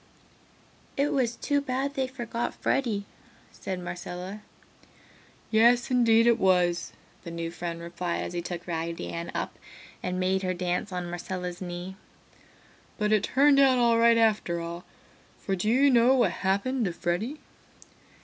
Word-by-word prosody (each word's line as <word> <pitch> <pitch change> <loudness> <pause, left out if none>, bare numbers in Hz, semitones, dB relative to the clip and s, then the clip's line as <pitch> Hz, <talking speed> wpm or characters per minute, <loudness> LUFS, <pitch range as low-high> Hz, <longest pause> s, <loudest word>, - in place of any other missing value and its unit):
"It 280 +1 +1
was 245 -4 +1
too 285 -1 0
bad 275 +1 -2
they 265 -1 -1
forgot 240 -2 -4
Freddy," 220 -7 0 0.5
said 185 -1 -5
Marcella. 180 +3 -6 1.1
"Yes, 235 +3 +4
indeed 230 -2 +5
it 235 0 +4
was!" 180 -2 +2 0.3
the - - -7
new 165 0 -4
friend 170 -1 -5
replied 170 +1 -3
as - - -6
he 175 - -2
took 175 0 -6
Raggedy 165 -1 -4
Ann 170 0 -5
up - - -4 0.4
and 180 0 -2
made 190 +1 +1
her 185 -1 -1
dance 180 +2 -2
on 180 -1 -3
Marcella's 180 0 -5
knee. 180 +1 -6 1.0
"But 210 0 0
it 215 - +4
turned 275 +1 +4
out 265 -2 +5
all 235 -1 +4
right 230 0 +5
after 215 -6 +2
all, 170 +1 -6 0.5
for 195 - -2
do 190 +4 -1
you 270 +4 +4
know 245 +2 +5
what 235 -8 +3
happened 205 +8 0
to 180 - -2
Freddy?" 195 - -2
195 Hz, 150 wpm, -27 LUFS, 175-240 Hz, 1.1 s, indeed